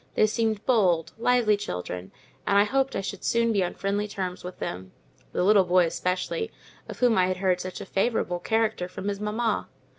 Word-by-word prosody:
They - - +5
seemed 220 -1 -1
bold, 185 -10 +2
lively 235 -3 +3
children, 90 - -5 0.4
and 200 - +4
I 200 - +7
hoped 270 +5 0
I - - 0
should 195 -1 -6
soon 230 0 +2
be 200 -3 +2
on 175 - -3
friendly 200 +1 -1
terms 185 -3 -4
with 180 +1 -7
them—the 90 - -6
little 200 0 +6
boy 180 0 +4
especially, 180 - -2 0.4
of - - -7
whom 240 -5 +4
I 180 - +4
had 185 0 -1
heard 185 -1 +1
such 185 +1 -6
a - - -6
favourable 195 -3 0
character 220 -2 0
from 190 +2 -5
his 200 -1 -3
mamma. 215 +2 -1
200 Hz, 190 wpm, -26 LUFS, 180-220 Hz, 0.4 s, I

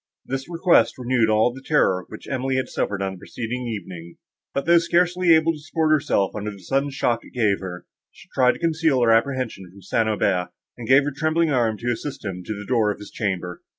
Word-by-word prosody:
This 135 +3 -4
request 170 +1 +3
renewed 125 -3 +1
all 110 +3 +3
the 135 - -10
terror 95 - +1
which 110 - -10
Emily 130 0 -1
had 130 - 0
suffered 100 -1 -2
on 95 - -2
the 95 - -9
preceding 125 +5 -5
evening; 90 -6 -7 0.4
but, 140 - -2
though 170 0 +6
scarcely 175 0 +3
able 160 +1 +2
to 155 - -9
support 155 +1 -1
herself, 145 - +2
under 105 0 -3
the 100 - -9
sudden 135 +10 -1
shock 120 -4 -1
it - - -16
gave 105 -5 +2
her, 90 -2 -7 0.3
she - - -17
tried 125 -1 +4
to - - -11
conceal 160 -6 +2
her 115 - +4
apprehensions 115 -5 0
from 100 0 -16
St. 110 +4 0
Aubert, 95 -4 0 0.3
and 120 -2 -8
gave 135 +2 +6
her 145 - -2
trembling 155 +2 +1
arm 115 -5 +1
to 120 +2 -2
assist 135 +3 -5
him 95 -2 -4
to 110 - -3
the 105 0 -8
door 115 -3 +2
of 105 - -2
his 105 - -11
chamber. 90 -5 -3
120 Hz, 220 wpm, -23 LUFS, 105-145 Hz, 0.4 s, though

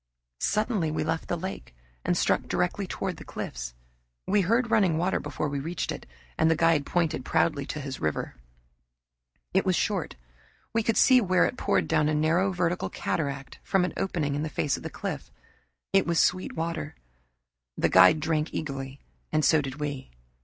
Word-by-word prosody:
Suddenly 210 -5 +1
we 155 0 -1
left 160 +1 -2
the 175 - -1
lake 180 - -6 0.3
and - - +1
struck - - +1
directly - - -1
toward - - -3
the - - -9
cliffs. - - -6 0.5
We 205 +1 +3
heard 230 +5 +1
running 195 -8 +3
water 180 +3 +1
before 150 +1 -3
we 145 -1 -2
reached 165 +5 -3
it, - - -7 0.3
and 160 - +4
the 160 - +4
guide 165 -3 +3
pointed 165 -6 0
proudly 155 -2 +1
to 155 - -4
his 135 -2 -5
river. 75 -1 -2 1.2
It 190 - +3
was 185 -2 +2
short. 195 -3 -1 0.6
We 230 - +2
could 225 0 0
see 255 -2 +6
where 185 -3 +3
it - - -2
poured - - +1
down 150 0 +2
a 155 - +1
narrow 165 +6 +2
vertical 180 -1 -1
cataract 140 -3 -3
from 190 -2 +2
an - - -4
opening 160 -7 -1
in 145 - -1
the 155 - -2
face 145 -2 0
of - - -8
the - - -5
cliff. - - -5 0.6
It 195 -3 +4
was 170 -1 +2
sweet 185 - +1
water. 165 - -3 0.8
The - - +3
guide 95 +11 +7
drank 155 0 0
eagerly 135 -2 -5 0.3
and 155 -1 +2
so 160 -2 +5
did 135 -2 -5
we. 145 -2 -4
160 Hz, 180 wpm, -27 LUFS, 145-185 Hz, 1.2 s, guide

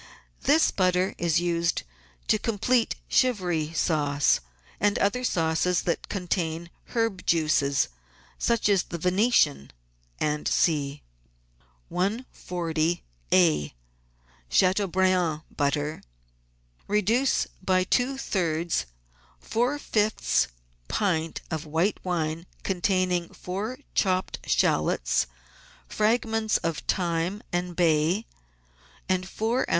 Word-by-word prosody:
This 310 +3 +4
butter 185 0 +1
is 170 -2 +2
used 170 -1 0 0.4
to 215 - +3
complete 230 +2 +1
Chivry 180 - +1
sauce 145 -4 +2 0.4
and 205 0 +2
other 225 +5 +1
sauces 170 -3 +1
that 170 - -2
contain 170 -3 -2 0.2
herb 225 -5 0
juices, 155 -4 +2 0.5
such 235 -3 +1
as 200 -3 +4
the 170 - -6
Venetian, 180 - +2 0.5
&c. 150 -1 0 0.9
140a— 160 - 0 0.8
CHATEAUBRIAND 185 - +2
BUTTER 145 +1 -1 0.9
Reduce 220 +6 +2 0.2
by 185 -1 +2
two 250 +7 +1
thirds 170 - -1 0.5
four 245 - 0
fifths 210 - +1 0.4
pint 165 - -1
of 160 -1 -3
white 165 +7 +1
wine 165 -1 -2 0.2
contain 185 0 +1
ing 175 -1 -1
four 205 +7 -5 0.2
chopped 185 - 0
shallots, - - +2 0.6
fragments 220 0 +1
of 165 -2 -2
thyme 175 +3 -1
and 175 0 -2
bay, 170 +4 +2 0.8
and 185 0 0
four 225 +5 0
oz. - - -2
180 Hz, 95 wpm, -26 LUFS, 160-205 Hz, 0.9 s, This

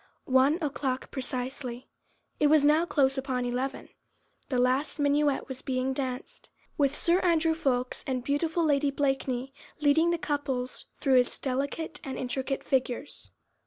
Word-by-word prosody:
One 265 +4 +4
o'clock 270 -3 -2
precisely! 255 -1 -4 0.5
It 295 - +4
was 300 -1 +5
now 310 +3 +4
close 270 -4 +2
upon 260 -2 -2
eleven, 250 +2 -3 0.6
the 255 - 0
last 260 +4 +1
minuet 290 -1 +2
was 265 -1 -7
being 260 0 -1
danced, 260 -1 -5 0.3
with 280 -1 +2
Sir 345 +2 +3
Andrew 330 -3 +2
Ffoulkes 255 -5 -1
and 255 -2 -1
beautiful 320 +5 0
Lady 290 -1 +2
Blakeney 270 -2 -1 0.3
leading 305 +3 +4
the 340 - +1
couples, 275 -5 -2
through 270 -3 +4
its 245 - 0
delicate 280 +4 -3
and 270 - -5
intricate 265 +2 -3
figures. 255 -2 -2
270 Hz, 140 wpm, -28 LUFS, 255-295 Hz, 0.6 s, was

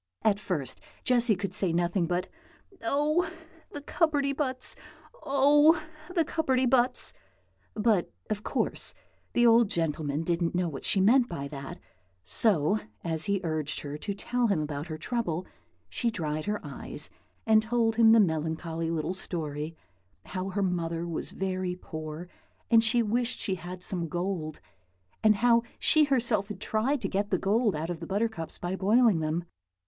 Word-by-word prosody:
At 205 -2 +3
first, 150 - -3 0.2
Jessy 240 -3 +4
could 190 0 -4
say 185 -2 +2
nothing 175 +1 +1
but 180 +1 -1 0.6
"Oh! 295 +8 +1 0.4
the 290 - -6
cupperty 290 -2 +1
buts! 260 -3 -1 0.5
oh! 290 +4 +5 0.4
the 335 -2 +3
cupperty 265 -5 +1
buts!" 250 0 +3 0.6
but, 210 -4 +2 0.2
of 210 -1 -2
course, - - -2 0.4
the 240 - +4
old 230 -2 +6
gentleman 155 -3 -1
didn't 170 0 0
know 180 0 +1
what 140 -5 -6
she 200 - +2
meant 240 +6 +4
by 140 -5 -4
that, 140 -2 -7 0.4
so, 150 - +3 0.2
as 160 -1 +1
he 200 -2 0
urged 155 -3 -2
her 145 0 -6
to 200 +7 -4
tell 245 +4 0
him 200 -6 +1
about 150 0 -4
her 155 -1 -5
trouble, 180 -3 -2 0.4
she 240 - -1
dried 155 -7 -3
her 210 0 -1
eyes, - - -3 0.3
and 220 -1 +5
told 225 0 0
him 225 -1 +7
the 225 - +7
melancholy 160 -2 -1
little 165 +2 -1
story: 155 -4 -4 0.5
how 185 +1 -4
her 200 +1 -1
mother 170 -2 -1
was 170 -2 -2
very 185 -1 -2
poor, 155 -1 -7 0.4
and 230 -1 +7
said 225 - +4
she 240 0 +3
wished 235 +3 0
she 190 - -1
had 180 0 -6
some 175 -3 -1
gold; 175 -2 -3 0.6
and 215 -1 +6
how 235 +2 +4 0.2
she 310 -1 +5
herself 235 -7 +2
had 210 -3 -7
tried 230 +8 0
to - - -1
get 205 +1 -1
the 185 - +2
gold 210 +2 +1
out 160 +3 -3
of 170 - -5
the 165 - -7
buttercups 200 -4 -2
by 175 +1 -3
boiling 210 0 +4
them. 160 +2 -1
195 Hz, 165 wpm, -28 LUFS, 165-235 Hz, 0.6 s, him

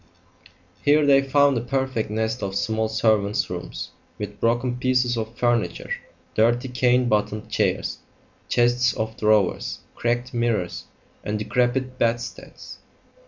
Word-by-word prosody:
Here 150 +1 +4
they 135 -1 +6
found 140 0 +3
a - - -5
perfect 130 -2 -1
nest 110 +2 -2
of 95 -1 -3
small 110 +2 0
servants' 110 -2 +1
rooms, - - -6 0.3
with 105 0 -6
broken 120 +2 +1
pieces 125 -1 +1
of 115 0 -5
furniture, 120 -2 0 0.4
dirty 120 +4 +2
cane 125 0 +2
bottomed 105 0 -1
chairs, - - 0 0.5
chests 120 0 +3
of 110 0 -3
drawers, 105 -3 +1 0.2
cracked 120 +2 -1
mirrors, 115 -7 -1 0.4
and 105 +1 -2
decrepit 125 +4 0
bedsteads. 120 +1 -3
120 Hz, 120 wpm, -23 LUFS, 110-125 Hz, 0.5 s, they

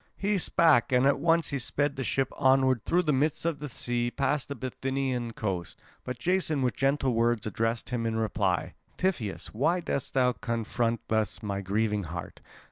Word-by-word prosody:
He 200 0 +1
spake, 160 -9 +4
and 125 +1 +4
at 140 0 +3
once 165 +1 +2
he 140 - -2
sped 145 +3 0
the 135 - -3
ship 135 +1 -1
onward 130 -3 +3
through 180 +1 +2
the 150 -3 +1
midst 145 +4 0
of 165 -3 0
the 150 0 -5
sea 120 0 -1
past 140 +1 -1
the 140 - -5
Bithynian 130 -2 -2
coast. 95 -6 -4 0.2
But 125 -1 -5
Jason 160 -1 +1
with 125 - 0
gentle 135 -1 +1
words 115 0 +1
addressed 115 +3 -2
him 115 -2 -1
in 110 - -1
reply: 105 -5 0 0.2
"Tiphys, 145 - -2
why 150 +11 +2
dost 140 -7 -3
thou 125 -1 +3
comfort 115 0 -1
thus 110 -2 -1
my 100 -1 -2
grieving 105 +1 0
heart? 85 +1 -7
125 Hz, 180 wpm, -28 LUFS, 115-140 Hz, 0.2 s, spake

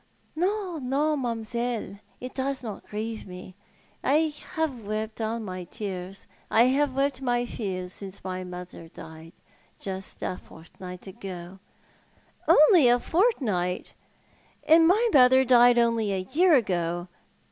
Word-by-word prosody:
"No, 370 0 -1
no, 285 +4 0
mam'selle, 235 -4 -3 0.2
it 255 0 -7
does 265 0 -2
not 215 -4 -7
grieve 220 +1 -5
mo. 185 0 -10 0.5
I 305 +2 +2 0.2
have 300 -8 -2
wept 215 +2 -4
all 225 +1 -2
my 185 -4 -6
tears. 190 -1 -7 0.2
I 225 - +5
have 280 -1 +1
wept 275 -1 0
my 245 -2 0
fill 190 -6 -4
since 190 +1 -11
my 185 0 -4
mother 180 -2 -9
died 160 0 -12 0.3
— - - -35
^just 190 -1 -7
a 180 - -4
fortnight 180 +2 -12
ago." 190 -2 -9 0.4
" - - -34
Only 305 - +7
a 240 0 +5
fortnight! 240 - 0 0.7
And 325 +1 +6
my 430 +7 +4
mother 260 0 +6
died 245 -1 +6
only 230 -3 +2
a 185 -1 -3
year 345 +1 +5
ago. 175 -6 0
230 Hz, 135 wpm, -26 LUFS, 185-270 Hz, 0.7 s, Only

